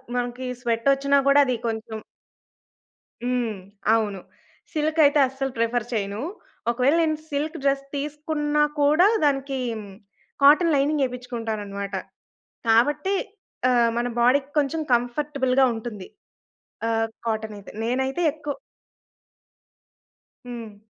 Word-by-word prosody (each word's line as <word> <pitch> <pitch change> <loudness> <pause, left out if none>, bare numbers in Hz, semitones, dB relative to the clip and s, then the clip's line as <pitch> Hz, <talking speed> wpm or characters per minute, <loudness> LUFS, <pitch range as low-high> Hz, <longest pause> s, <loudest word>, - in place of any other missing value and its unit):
మనకి 245 +1 -2 0.2
స్వెట్ 230 0 -1
వచ్చినా 280 +1 +2
కూడా 285 +1 +6
అది 255 - 0
కొంచెం 220 0 -4 1.2
హ్మ్. 245 -4 -1 0.4
అవును. 210 -3 0 0.5
సిల్క్ 310 +1 0
అయితే 290 +1 +4
అస్సలు 270 0 -4
ప్రిఫర్ 230 0 0
చేయను. 205 +1 -2 0.5
ఒకవేళ 255 +6 +2
నేను 310 -1 +1
సిల్క్ 305 +3 -2
డ్రెస్ 275 0 +2
తీసుకున్నా 295 +1 -1 0.2
కూడా, 305 +6 +5 0.2
దానికి 275 -1 0 0.9
కాటన్ 310 +3 +6
లైనింగ్ 285 +1 +2
ఎపించుకుంటానన్నమాట. 220 -5 -5 0.7
కాబట్టి 295 - +3 0.6
ఆహ్, 240 -2 +4
మన 240 +1 0
బాడీకి 270 +4 +3
కొంచెం 300 +2 +1
కంఫర్టబుల్‌గా 260 +1 +2
ఉంటుంది. 225 -4 -7 0.8
ఆహ్, 225 0 +1 0.2
కాటన్ 220 -1 -2
అయితే 200 - -12
నేనైతే 265 +7 0
ఎక్కువ 295 -1 -5 2.0
హ్మ్. 230 -4 -8
255 Hz, 105 wpm, -24 LUFS, 230-290 Hz, 2.0 s, కూడా